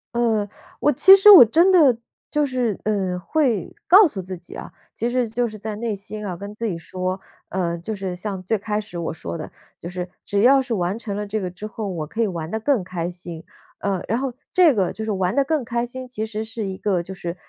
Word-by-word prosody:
呃， 225 -3 +1 0.3
我 295 - +3
其 380 +9 +8
实 395 +2 +7
我 380 -11 +12
真 335 - +4
的 280 -9 +6 0.3
就 300 -1 +2
是， 250 -6 -1
嗯， 190 -4 -1
会 240 - -1
告 385 +1 +8
诉 195 -9 -6
自 185 0 -7
己 175 - -13
啊。 - - -8 0.2
其 235 +2 -1
实 250 -1 0
就 240 +2 -1
是 215 -1 -10
在 215 0 -5
内 225 0 -3
心 210 +2 -7
啊 180 -3 -4
跟 200 +2 -8
自 230 - -4
己 180 -5 -3
说， 185 +3 -4 0.3
呃， 170 -2 -2
就 175 +6 -5
是 190 -2 -4
像 190 +1 -5
最 210 +4 0
开 210 +1 -2
始 205 -5 -8
我 165 -1 -3
说 165 - -6
的， 155 - -8 0.3
就 170 - -8
是 180 0 -5 0.2
只 200 - -1
要 265 +4 +6
是 250 -3 -4
完 185 +1 -1
成 205 -4 -5
了 210 0 -4
这 215 +1 -2
个 180 -1 -4
之 205 +4 -8
后 215 -1 -5
我 160 -5 -4
可 225 +7 -3
以 - - +1
玩 170 -4 -5
得 220 +2 -3
更 260 -4 +2
开 175 -1 -4
心， 170 -2 -9 0.4
呃， 195 -2 -1
然 230 - 0
后 265 -1 -3 0.2
这 345 -6 +6
个， 190 -5 0
就 220 - -6
是 220 - -2
玩 190 +1 -1
得 280 - +4
更 295 -2 -1
开 235 +1 -1
心， 255 +1 -8
其 220 -3 -4
实 220 0 -5
是 225 -1 -5
一 190 -1 -5
个 185 -4 0
就 190 - -8
是， 175 -2 -5
210 Hz, 265 characters per minute, -22 LUFS, 185-240 Hz, 0.4 s, 我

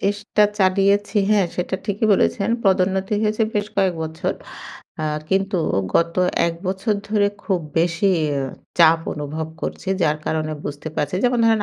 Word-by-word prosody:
চেষ্টা 205 +1 +1 0.2
চালিয়েছি। 200 +2 +2
হ্যাঁ, 205 -3 +4
সেটা 180 +1 -1
ঠিকই 205 +2 0
বলেছেন। 200 +2 +1 0.2
পদোন্নতি 190 +1 +2
হয়েছে 215 +1 +1
বেশ 205 0 0
কয়েক 190 -3 +2
বছর। 160 0 -3 0.7
আ - - -1 0.3
কিন্তু 195 0 +1 0.4
গত 170 0 +2 0.3
১ 170 - -1
বছর 190 +4 0
ধরে 205 -1 +2 0.2
খুব 190 -4 0 0.2
বেশিই 170 +2 +2 0.6
চাপ 165 -1 +6
অনুভব 155 +2 -4
করছি। - - -5
যার 155 -1 +2
কারণে 155 -1 -1
বুঝতে 145 +2 -5
পারছি। 145 +3 -1
যেমন 245 0 +3
ধরেন 225 -2 +3
190 Hz, 145 wpm, -21 LUFS, 165-205 Hz, 0.7 s, চাপ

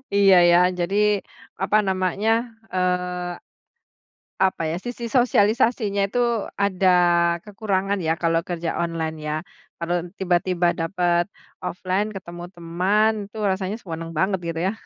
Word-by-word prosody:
Iya 195 -1 +6 0.2
ya, 175 - +6 0.2
jadi 180 +3 -1 0.7
apa 210 +2 +3
namanya, 190 +3 0 0.4
eee, 180 -1 -1 1.1
apa 190 -3 0
ya, 170 - -2
sisi 245 -1 -5
sosialisasinya 220 -3 +2
itu 245 - -2 0.5
ada 190 -1 +2 0.6
kekurangan 200 -1 -1
ya, 160 - +3
kalau 165 0 +2
kerja 170 -2 -2
online 165 -2 -2
ya, 150 - -1 0.4
kalau 175 +1 -1 0.2
tiba-tiba 180 -1 +1
dapat 175 0 +1 0.4
offline 185 +3 -1
ketemu 175 -2 -8
teman 185 +6 +1 0.2
itu 215 - -16
rasanya 190 +2 -2
senang 165 -2 -6
banget, 190 +4 +1
gitu 165 0 -3
ya? - - -1
185 Hz, 120 wpm, -23 LUFS, 170-200 Hz, 1.1 s, Iya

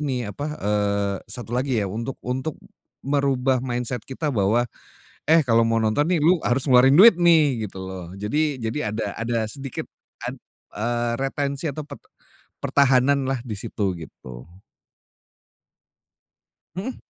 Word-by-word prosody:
ini 125 -7 -2
apa 145 +8 -5
eee, 100 -1 0
satu 120 +2 -5
lagi 130 -3 0
ya, 100 - -1
untuk 115 +6 -5
untuk 130 +5 -3 0.5
merubah 135 -2 +1
mindset 125 -1 -3
kita 150 +3 -4
bahwa, 115 0 +1 0.6
eh 160 -4 +5
kalau 115 -1 +4
mau 115 0 +2
nonton 110 +6 +1
nih, 180 - +3
lu 165 +3 +3
harus 125 +3 +1
ngeluarin 130 0 +6
duit 225 +3 +10
nih, 155 -10 +4
gitu 95 - -10
loh. 90 -2 -7
Jadi 145 +8 0
jadi 115 +1 -2
ada 110 - -2
ada 115 +1 -2
sedikit 135 +3 -6 0.4
ad - - -4 0.4
eee, 120 +2 -1
retensi 140 +2 -2
atau 145 +1 -7
pert - - -11 0.6
pertahanan 135 0 +3
lah, 135 - 0
disitu 105 -3 -3
gitu. 65 -6 -11 2.3
Mhm. 220 +8 -5
125 Hz, 135 wpm, -23 LUFS, 110-140 Hz, 2.3 s, duit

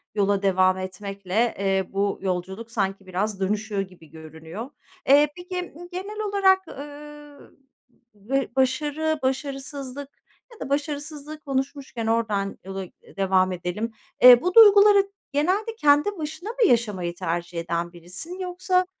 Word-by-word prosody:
yola 200 -1 +2
devam 185 -1 +3
etmekle, 195 +3 -2
eee, 195 -1 0
bu 200 0 0
yolculuk 190 +4 -4
sanki 195 -3 -2
biraz 195 +2 -2
dönüşüyor 205 +1 -1
gibi 185 -5 -11
görünüyor. 160 - -9 0.4
Eee, 290 +2 +7
peki, 360 0 -6 0.2
genel 395 +4 -6
olarak, 380 -2 +3
ııı, 295 0 -11 0.6
ve 255 +7 -2
başarı, 295 +4 0
başarısızlık 270 0 -4 0.4
Ya 455 - -17
da - - -6
başarısızlığı 295 +1 -3
konuşmuşken, 270 -4 -3
oradan 215 -3 0
yola 195 0 -5 0.3
devam 190 -1 +2
edelim: 180 +6 -3 0.3
E, 250 -1 +10
bu 360 +4 -1
duyguları 410 -2 +8 0.2
genelde 380 +10 0
kendi 295 +4 +3
başına 315 +5 -6
mı 475 -2 +2
yaşamayı 200 -8 0
tercih 170 0 -3
eden 170 +1 -3
birisin, 180 - -8
yoksa 365 0 0
245 Hz, 125 wpm, -24 LUFS, 195-305 Hz, 0.6 s, E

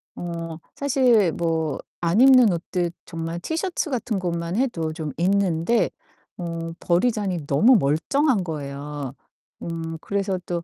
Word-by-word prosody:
어 165 -2 -5 0.2
사실 250 -9 +3
뭐 160 -2 -1 0.3
안 175 +7 +2
입는 255 -4 +7
옷들 175 0 -2
정말 165 0 -5
티셔츠 330 - -2
같은 230 -5 -1
것만 170 0 -2
해도 180 -12 0
좀 155 -3 -5
있는데 185 +3 +2 0.5
어 165 -1 -4
버리자니 185 -4 0
너무 225 - +5
멀쩡한 200 - +2
거예요. 145 -3 -5 0.5
음 165 -1 -4
그래서 195 -1 -1
또 170 -1 -3
175 Hz, 235 characters per minute, -24 LUFS, 165-215 Hz, 0.5 s, 입는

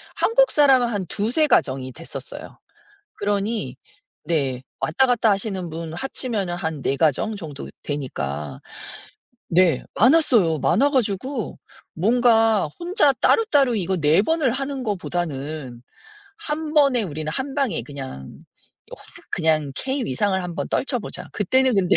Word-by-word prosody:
한국 - - +3
사람은 270 -4 +5
한 205 -5 -2
2-3 240 - +1
가정이 130 - +1
됐었어요. 165 +3 -9 0.6
그러니 205 - -2 0.5
네. 135 -6 -1 0.2
왔다 215 +12 +2
갔다 240 -3 +3
하시는 195 -3 -3
분 165 0 -6
합치면은 215 -4 -2
한 160 -5 -4
4 135 - 0
가정 160 +8 +1
정도 155 -8 -8
되니까. 75 - -4 0.9
네. 175 -1 +3
많았어요. 230 - +4
많아 245 - +3
가지고 245 0 -1 0.4
뭔가 225 -1 +3
혼자 345 -4 +3
따로따로 280 - +3
이거 190 -2 -1
4 155 +3 +4
번을 310 +1 +1
하는 270 +1 -3
거보다는 155 - -4 0.6
1 310 -3 -4
번에 275 -5 +4
우리는 155 -4 -4
한 270 - -4
방에 270 - 0
그냥 135 - -9 0.4
또 - - -11
확 - - -16 0.3
그냥 155 -4 +1
K 265 0 -2
위상을 190 +8 0
한번 175 0 -4
떨쳐 265 -2 0
보자. 215 - -7
그때는 260 +5 +2
근데 190 -3 +3
200 Hz, 255 characters per minute, -22 LUFS, 155-260 Hz, 0.9 s, 사람은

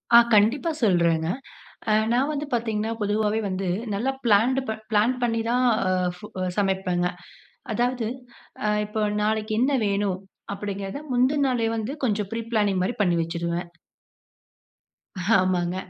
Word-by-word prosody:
ஆ. - - +12 0.2
கண்டிப்பா 230 +10 +4
சொல்றேங்க. 170 -5 +3 0.9
நான் 265 +5 +2
வந்து 295 +1 -3
பார்த்தீங்கன்னா, 225 -1 -1
பொதுவாவே 210 +1 +1
வந்து, 185 0 -2 0.3
நல்லா 245 +7 0
பிளான்டு 235 +4 +4
ப 220 - +1 0.2
பிளான் 215 +4 +3
பண்ணி 230 -1 +1
தான் 250 +1 +2 0.5
ஃபு 210 +3 -10 0.3
சமைப்பேங்க. 190 -3 +1 0.7
அதாவது, 245 0 0 0.6
அ - - +2 0.2
இப்ப 210 +1 -2 0.2
நாளைக்கி 215 +1 0
என்ன 265 +3 +3 0.2
வேணும்? 200 -2 0 0.4
அப்டின்கிறத 200 +5 -5
முந்தின 260 +4 +3
நாளே 240 -3 +1
வந்து, 220 +3 -3
கொஞ்சம் 210 -4 -1
ப்ரீ 230 - -3
பிளானிங் 205 -4 +2
மாரி 195 - -1
பண்ணிவச்சிருவேன். 170 0 -1 1.7
ஆமாங்க. 180 -1 +1
210 Hz, 120 wpm, -25 LUFS, 190-235 Hz, 1.7 s, ஆ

